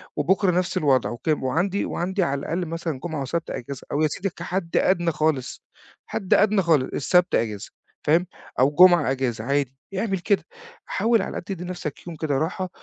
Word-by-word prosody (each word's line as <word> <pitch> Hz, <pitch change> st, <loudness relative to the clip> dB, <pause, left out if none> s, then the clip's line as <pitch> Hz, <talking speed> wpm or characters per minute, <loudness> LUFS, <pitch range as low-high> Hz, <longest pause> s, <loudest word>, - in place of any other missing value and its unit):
وبُكره 185 Hz, +6 st, +2 dB
نفس 180 Hz, 0 st, 0 dB
الوضع. 135 Hz, -4 st, +2 dB
وك 120 Hz, -, -8 dB
وعندي 160 Hz, +7 st, +1 dB
وعندي 185 Hz, +2 st, -1 dB
على 140 Hz, -3 st, -1 dB
الأقل 170 Hz, +5 st, -2 dB
مثلًا 165 Hz, -4 st, -4 dB
جُمعة 160 Hz, -4 st, -3 dB
وسبت 165 Hz, +5 st, -3 dB
أجازة، 135 Hz, +2 st, -6 dB
أو 145 Hz, -, 0 dB
يا 155 Hz, -, +4 dB
سيدي 195 Hz, +6 st, -3 dB
كحد 175 Hz, 0 st, -3 dB
ادنى 175 Hz, -3 st, +2 dB
خالص، 150 Hz, -5 st, -1 dB, 0.4 s
حد 195 Hz, -4 st, -1 dB
ادنى 210 Hz, -1 st, +4 dB
خالص، 155 Hz, -6 st, +2 dB
السبت 180 Hz, +5 st, +2 dB
أجازة. 105 Hz, -3 st, -2 dB, 0.3 s
فاهم، 165 Hz, +4 st, +3 dB, 0.3 s
أو 130 Hz, -, +6 dB
الجُمعة 175 Hz, -2 st, +6 dB
أجازة 125 Hz, -4 st, -2 dB
عادي. 135 Hz, 0 st, -1 dB, 0.2 s
اعمل 195 Hz, -2 st, -1 dB
كده، 195 Hz, +3 st, +1 dB, 0.4 s
حاول 230 Hz, -2 st, +2 dB
على -, -, -3 dB
الأقل -, -, -5 dB
تدّي 180 Hz, -1 st, -5 dB
نفسك 175 Hz, -4 st, -6 dB
يوم 170 Hz, -, -6 dB
كده 145 Hz, -3 st, -1 dB
راحة، 185 Hz, +4 st, -2 dB
165 Hz, 180 wpm, -24 LUFS, 140-185 Hz, 0.4 s, أو